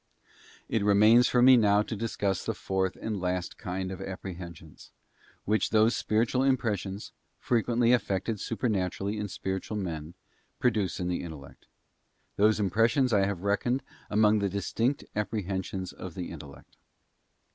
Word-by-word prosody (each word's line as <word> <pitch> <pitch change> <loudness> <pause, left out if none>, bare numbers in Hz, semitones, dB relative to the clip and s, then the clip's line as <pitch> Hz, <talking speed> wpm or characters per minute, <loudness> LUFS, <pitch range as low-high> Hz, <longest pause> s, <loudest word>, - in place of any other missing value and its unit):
Ir 110 - 0
remains 105 +4 +6
for 125 -1 +3
me 130 +1 +9
now 105 -3 +4
to 110 - -5
discuss 100 -3 -2
the - - -2
fourth 95 -1 -1
and 105 -4 -3
last 90 0 -2
kind 95 -2 -4
of 95 - -7
apprehensions, 85 -4 -8 0.6
which 105 +1 +1
those 110 +2 +4
spiritual 115 +4 +1
impressions, 105 -7 -1 0.3
frequently 120 0 +2
effected 105 -3 0
supernaturally 100 -2 -2
in 105 - -2
spiritual 95 +2 -4
men, 85 -4 -5 0.4
produce 105 -7 0
in 90 - -2
the 90 - -1
intellect. 75 -5 -10 0.7
Those 110 +1 +3
impressions 115 +6 +2
I 100 -2 +4
have 100 -4 -3
reckoned 120 +6 0 0.3
among 105 0 +4
the 100 -1 0
distinct 115 +7 -1
apprehensions 95 -3 -3
of 90 -3 -8
the 90 -2 -5
intellect. 75 -4 -12
100 Hz, 135 wpm, -28 LUFS, 95-110 Hz, 0.7 s, me